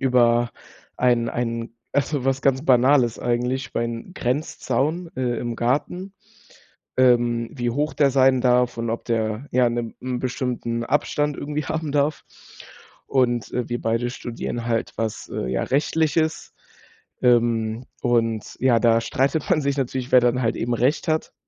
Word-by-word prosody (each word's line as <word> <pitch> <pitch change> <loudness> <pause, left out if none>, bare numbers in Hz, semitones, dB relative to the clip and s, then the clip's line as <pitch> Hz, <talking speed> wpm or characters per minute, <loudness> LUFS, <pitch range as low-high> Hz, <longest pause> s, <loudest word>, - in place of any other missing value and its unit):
über 120 -2 +3 0.5
einen 120 -2 +2
einen 115 -1 -3 0.2
also, 140 -1 0
was 135 0 +1
ganz 135 0 +1
Banales 125 -3 +4
eigentlich 125 +2 -1
über - - -3
einen 115 +9 -4
Grenzzaun, 150 +4 -1
äh, 125 -2 -1
im 120 -1 -3
Garten, 165 +11 -1 0.8
ähm, 120 -2 +3
wie 120 -2 -2
hoch 150 +5 -1
der 140 -2 +3
sein 130 -1 +4
darf 125 -1 +2
und 115 0 -2
ob 115 - -4
der, 110 +2 -1
ja, 125 0 +4
'ne, 120 -1 -3
'n 125 -1 -3
bestimmten 125 -2 -2
Abstand 145 +2 0
irgendwie 150 +1 -4
haben 160 0 -3
darf. 145 +1 0 0.8
Und, 120 -3 +1
äh, 125 -2 -1
wir 120 0 -2
beide 115 +2 0
studieren 120 -1 -5
halt 115 -1 -1
was, 110 -2 -3
äh, - - -2
ja, 65 - -1
Rechtliches. 155 +2 0 0.7
Ähm, 115 -1 +2 0.2
und, 115 -3 0
ja, 125 -3 +4
da 115 -1 +4
streitet 140 - 0
man 170 -5 +3
sich 140 -1 0
natürlich, 130 -1 -2
wer 130 - +8
dann 125 +1 +1
halt 115 - +1
eben 120 +1 -1
Recht 125 +6 +1
hat, 155 0 -1
125 Hz, 155 wpm, -23 LUFS, 120-140 Hz, 0.8 s, wer